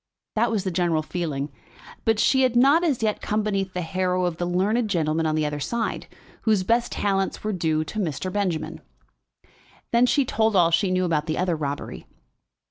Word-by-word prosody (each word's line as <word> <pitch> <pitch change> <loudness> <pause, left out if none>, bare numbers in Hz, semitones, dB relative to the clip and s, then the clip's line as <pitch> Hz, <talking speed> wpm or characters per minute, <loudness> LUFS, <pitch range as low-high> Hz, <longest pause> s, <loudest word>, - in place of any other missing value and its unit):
That 230 +2 +2
was 215 -4 -1
the 190 - -2
general 170 -3 +1
feeling. 150 -4 -3 0.5
But 225 -1 +3
she 265 +5 +3
had 255 -2 +2
not 280 +7 +5
as 285 -9 0
yet 215 -1 0
come 215 0 -1
beneath 195 -3 -1
the 180 - -2
harrow 185 +1 0
of 175 -2 -2
the 175 - -2
learned 210 +6 +1
gentleman 160 -3 0
on 155 - 0
the 155 -1 +1
other 150 0 -3
side, 230 +10 -2 0.3
whose 215 -4 +2
best 235 +4 +1
talents 195 -1 -1
were 215 0 -1
due 160 -3 0
to 215 +7 -6
Mr. 180 0 -3
Benjamin. 185 -6 -2 1.1
Then 235 +1 +4
she 280 +1 +2
told 220 -3 +1
all 170 -3 +5
she 185 +3 +2
knew 185 0 +1
about 155 -2 0
the 155 - -1
other 180 -2 +1
robbery. 145 -2 -5
185 Hz, 195 wpm, -24 LUFS, 165-220 Hz, 1.1 s, not